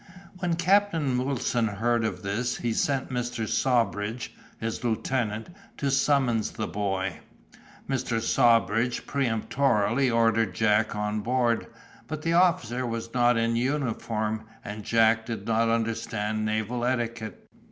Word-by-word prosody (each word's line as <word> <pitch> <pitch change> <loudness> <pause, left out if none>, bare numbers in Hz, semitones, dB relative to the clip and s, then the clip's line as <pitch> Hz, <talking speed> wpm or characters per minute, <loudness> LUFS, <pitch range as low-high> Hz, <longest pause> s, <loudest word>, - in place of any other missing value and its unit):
When 175 -2 0
Captain 170 -8 +2
Wilson 125 -3 0
heard 115 +3 0
of 95 -4 -3
this 110 +5 -1
he 120 -2 -1
sent 135 -1 0
Mr. 120 -2 -2
Sawbridge, 115 -2 0 0.3
his 115 +3 -4
lieutenant, 115 +1 -1 0.3
to 140 -1 0
summon 135 -4 +2
the 110 - -2
boy. 95 -3 -2 0.7
Mr. 125 -4 -1
Sawbridge 115 +1 +2
peremptorily 125 -1 +1
ordered 115 -4 +2
Jack 105 +1 +2
on 105 0 -1
board; 120 +1 +1 0.4
but 155 0 -5
the 165 - +1
officer 160 -9 +2
was 115 -1 -4
not 120 -1 +3
in 115 0 +1
uniform, 115 -4 -1 0.2
and 105 +1 -6
Jack 110 0 +3
did 115 -2 -5
not 115 0 +2
understand 110 -2 -1
naval 110 +3 -1
etiquette. 115 -4 -2
115 Hz, 125 wpm, -27 LUFS, 110-125 Hz, 0.7 s, not